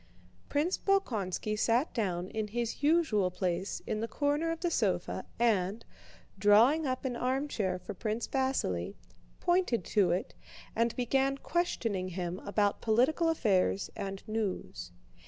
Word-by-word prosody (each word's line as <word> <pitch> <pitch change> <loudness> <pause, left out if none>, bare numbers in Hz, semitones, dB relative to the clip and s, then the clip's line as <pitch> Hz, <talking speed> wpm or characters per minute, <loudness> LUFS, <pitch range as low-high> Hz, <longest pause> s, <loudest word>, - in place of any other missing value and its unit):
Prince 310 +6 +1
Bolkónski 215 - 0
sat 235 +7 +1
down 185 -6 -1
in 220 -1 -3
his 235 +3 -3
usual 290 - +3
place 180 +1 -2
in 215 - -2
the 225 - -2
corner 290 +5 0
of 330 0 -3
the 345 -1 0
sofa - - 0
and, 215 -2 +1 0.5
drawing 235 +10 +5
up 255 +1 -2
an 250 -2 -1
armchair 250 -7 -1
for - - -7
Prince 215 +4 -3
Vasíli, 100 - -1 0.4
pointed 350 - +1
to 200 -5 +3
it 175 +2 -1 0.4
and 230 0 +1
began 270 +2 +1
questioning 230 - -1
him 180 0 -4
about 205 0 0
political 260 +9 +3
affairs 200 - +1
and 195 0 -5
news. 195 - -3
225 Hz, 135 wpm, -31 LUFS, 195-275 Hz, 0.5 s, drawing